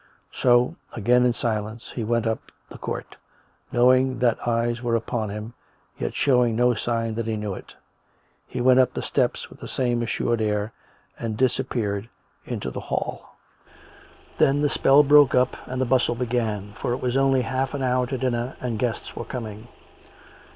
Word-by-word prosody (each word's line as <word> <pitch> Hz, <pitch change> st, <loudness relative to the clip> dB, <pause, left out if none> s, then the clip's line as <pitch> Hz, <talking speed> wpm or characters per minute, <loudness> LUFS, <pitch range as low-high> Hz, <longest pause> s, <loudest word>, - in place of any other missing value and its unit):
So, 125 Hz, +6 st, +3 dB, 0.2 s
again 125 Hz, +3 st, +3 dB
in 120 Hz, -, +2 dB
silence, 110 Hz, -1 st, -3 dB
he 120 Hz, -, -3 dB
went 115 Hz, +1 st, 0 dB
up 110 Hz, 0 st, -3 dB, 0.2 s
the -, -, -10 dB
court, -, -, -5 dB, 0.5 s
knowing 130 Hz, +1 st, +4 dB
that 120 Hz, -1 st, +1 dB
eyes 120 Hz, 0 st, 0 dB
were 120 Hz, -2 st, 0 dB
upon 115 Hz, -1 st, -2 dB
him, 105 Hz, +3 st, -6 dB, 0.5 s
yet -, -, -3 dB
showing 125 Hz, -4 st, +3 dB
no 125 Hz, +1 st, +3 dB
sign 115 Hz, 0 st, -1 dB
that 115 Hz, 0 st, -3 dB
he 110 Hz, -, -1 dB
knew 105 Hz, -2 st, -3 dB
it; -, -, -10 dB, 0.7 s
he -, -, -4 dB
went 130 Hz, +1 st, +5 dB
up 130 Hz, -, +3 dB
the -, -, -3 dB
steps -, -, -1 dB
with -, -, -14 dB
the -, -, -8 dB
same 120 Hz, -2 st, 0 dB
assured 120 Hz, 0 st, 0 dB
air, 105 Hz, 0 st, -1 dB, 0.5 s
and 110 Hz, -2 st, -3 dB
dis 125 Hz, 0 st, +2 dB
appeared 110 Hz, -5 st, -2 dB, 0.4 s
into 65 Hz, -, -4 dB
the -, -, -5 dB
hall. -, -, -4 dB, 1.0 s
Then 140 Hz, +2 st, +4 dB
the 145 Hz, -, +3 dB
spell 140 Hz, +2 st, +5 dB
broke 145 Hz, -2 st, +6 dB
up 125 Hz, 0 st, +3 dB
and 130 Hz, 0 st, -4 dB
the 130 Hz, -, +2 dB
bustle 125 Hz, -1 st, +2 dB
began, 115 Hz, -4 st, -2 dB
for 120 Hz, -, -2 dB
it -, -, -1 dB
was 125 Hz, 0 st, -1 dB
only 135 Hz, -1 st, +3 dB
half 130 Hz, +3 st, -2 dB
an 135 Hz, -, -2 dB
hour 125 Hz, 0 st, +1 dB
to 135 Hz, -, -3 dB
dinner 125 Hz, 0 st, -2 dB
and 120 Hz, -4 st, -3 dB
guests 120 Hz, -1 st, -3 dB
were -, -, -4 dB
coming. 110 Hz, -2 st, -6 dB
120 Hz, 180 wpm, -24 LUFS, 110-130 Hz, 1.0 s, broke